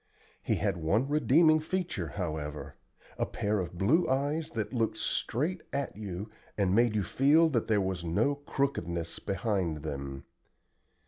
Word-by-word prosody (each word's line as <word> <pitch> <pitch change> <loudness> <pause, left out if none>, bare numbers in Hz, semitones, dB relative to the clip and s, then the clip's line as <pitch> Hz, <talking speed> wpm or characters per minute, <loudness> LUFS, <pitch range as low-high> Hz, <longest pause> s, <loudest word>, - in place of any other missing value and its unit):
He - - +1
had - - 0
one 100 +11 +1
redeeming 155 +2 +5
feature, 160 - -2
however 80 -6 -4 0.5
a - - +1
pair 105 0 -1
of 90 -1 -4
blue 145 - +3
eyes 145 +4 0
that 110 +1 -4
looked 115 -3 0
straight 165 +9 -1
at 140 0 -2
you 100 -1 -5 0.3
and 95 -3 +2
made 115 0 +4
you 105 - +1
feel 150 - +4
that 120 -7 0
there 110 -2 +3
was 95 -2 -2
no 100 +12 +2
"crookedness" 110 - -2
behind 95 -6 -1
them. 70 -3 -5
105 Hz, 145 wpm, -30 LUFS, 85-140 Hz, 0.5 s, redeeming